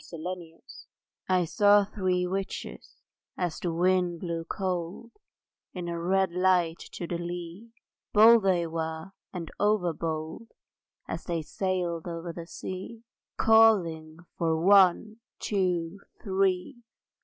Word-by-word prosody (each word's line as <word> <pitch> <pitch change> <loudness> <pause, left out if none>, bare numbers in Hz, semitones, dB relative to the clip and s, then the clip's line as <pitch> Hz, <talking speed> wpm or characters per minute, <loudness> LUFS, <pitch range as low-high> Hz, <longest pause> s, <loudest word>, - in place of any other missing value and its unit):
ONE, 165 - -7
TWO, 180 +3 -3
THREE 165 -1 -15 0.7
I 180 -1 +3
saw 205 +4 +4
three 185 -3 -1
witches 195 +2 -5 0.4
as 175 -3 -2
the 175 - -2
wind 175 0 +1
blew 170 -2 -3
cold 185 +5 -4 0.6
In 180 -2 -5
a 170 0 -3
red 190 +1 +1
light 180 -2 +2
to 175 - -5
the 170 0 -4
lee; 175 +5 -7 0.4
Bold 225 +2 +7
they 185 -3 +2
were 160 +1 -4 0.2
and 170 -3 -6
over 205 -5 +2
bold 160 +7 -5 0.6
As - - -5
they 170 -3 -2
sailed 180 -1 -2
over 170 0 -5
the 170 0 -8
sea; 190 +6 -7 0.3
Calling 180 -9 +4 0.2
for 160 -1 +1
One, 195 +3 +4 0.2
Two, 180 -2 -1 0.2
Three! 190 +3 0
180 Hz, 125 wpm, -28 LUFS, 170-195 Hz, 0.7 s, Bold